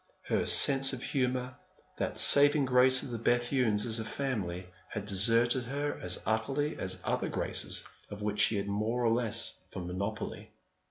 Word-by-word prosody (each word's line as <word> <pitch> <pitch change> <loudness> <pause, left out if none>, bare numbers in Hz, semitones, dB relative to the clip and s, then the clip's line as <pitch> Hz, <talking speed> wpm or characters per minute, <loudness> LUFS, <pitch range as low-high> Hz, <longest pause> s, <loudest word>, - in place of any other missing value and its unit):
Her - - -2
sense 135 -1 +5
of 125 - -7
humour, 125 -1 -3 0.4
that - - -3
saving 145 0 +7
grace 130 0 +3
of 125 - -8
the 115 - -5
Bethunes 120 -2 0
as 115 -1 -1
a - - -4
family, 105 -8 -5 0.2
had 105 -1 -6
deserted 115 +5 +2
her 145 +4 -4
as 90 0 -2
utterly 135 +7 -2
as 95 0 -3
other - - -3
graces - - -1 0.3
of 105 0 -9
which 105 0 -3
she 110 - +2
had 100 0 -4
more 110 +4 -2
or 115 - +2
less 115 -1 0 0.2
of 90 - -6
a - - -8
monopoly. 100 +5 -6
115 Hz, 170 wpm, -29 LUFS, 105-130 Hz, 0.4 s, saving